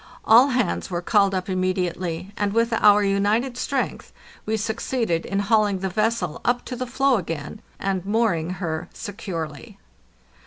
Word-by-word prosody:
All 240 +5 +7
hands 250 -8 -1
were 175 -1 -3
called 200 -1 +3
up 185 -1 -2
immediately, 185 -1 -2
and 205 -1 -1
with 230 +1 +2
our 210 -2 +5
united 205 +6 +1
strength 265 +1 -3 0.4
we 220 0 +1
succeeded 220 -4 -1
in 195 0 0
hauling 210 -1 +2
the 190 +1 -3
vessel 215 -4 -1
up 245 0 0
to 250 - -5
the 255 +1 -4
floe 270 +1 +2
again 165 +1 -5 0.2
and 190 -2 -1
mooring 200 -6 +1
her 160 -3 -4
securely. 195 -2 -6
205 Hz, 150 wpm, -23 LUFS, 185-230 Hz, 0.4 s, All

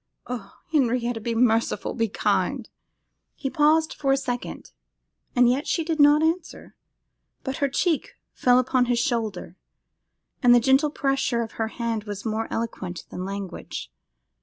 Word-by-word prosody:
Ah! 235 -5 -7
Henrietta, 245 -5 +1
be 230 +1 -2
merciful, 230 -1 +1
be 230 -1 0
kind!' 210 - -1 0.6
He 270 - -4
paused 315 +1 +3
for 275 -2 0
a 270 - +4
second, 245 -3 -5 0.6
and 245 -1 +5
yet 265 +6 +1
she 330 - 0
did 320 -1 -2
not 295 +1 +6
answer; 330 +1 -2 0.7
but 265 -1 -3
her 280 - +1
cheek 320 +4 0 0.2
fell 250 0 +4
upon 255 0 +2
his 245 0 +1
shoulder, 225 - -2 0.8
and 245 -1 +7
the - - +7
gentle 270 +5 +3
pressure 270 -4 0
of 225 - -7
her 225 - -2
hand 225 -2 -3
was 205 0 -6
more 220 0 -1
eloquent 195 -6 -4
than 180 - -5
language. 195 -2 -6
245 Hz, 150 wpm, -25 LUFS, 225-275 Hz, 0.8 s, and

